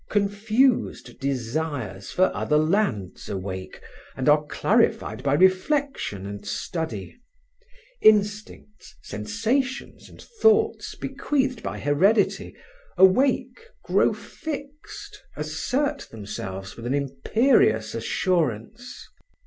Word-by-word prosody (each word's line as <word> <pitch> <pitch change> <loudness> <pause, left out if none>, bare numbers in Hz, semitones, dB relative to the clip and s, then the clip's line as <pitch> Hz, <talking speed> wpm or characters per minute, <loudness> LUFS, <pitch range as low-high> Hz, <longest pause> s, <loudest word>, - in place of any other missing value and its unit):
Confused 215 +5 +1
desires 130 -6 -3
for 185 +1 +2
other 150 - +1
lands 155 - 0
awake 95 -1 -6 0.3
and 130 - -3
are 150 +1 +5
clarified 110 -4 +1
by 140 +1 +1
reflection 190 - +1
and 100 0 -7
study. 120 - -5 0.8
Instincts, 210 0 +1
sensations 220 - -2
and - - -16
thoughts 445 -1 +1
bequeathed 265 -5 -1
by - - -4
heredity, 190 +9 +2 0.4
awake, 255 - +3 0.2
grow - - +3
fixed, 300 +6 -8 0.2
assert 160 - -2
themselves 95 -3 -7
with 115 0 -7
an 130 - 0
imperious 140 - +2
assurance. 160 - -2
165 Hz, 90 wpm, -24 LUFS, -, 0.8 s, are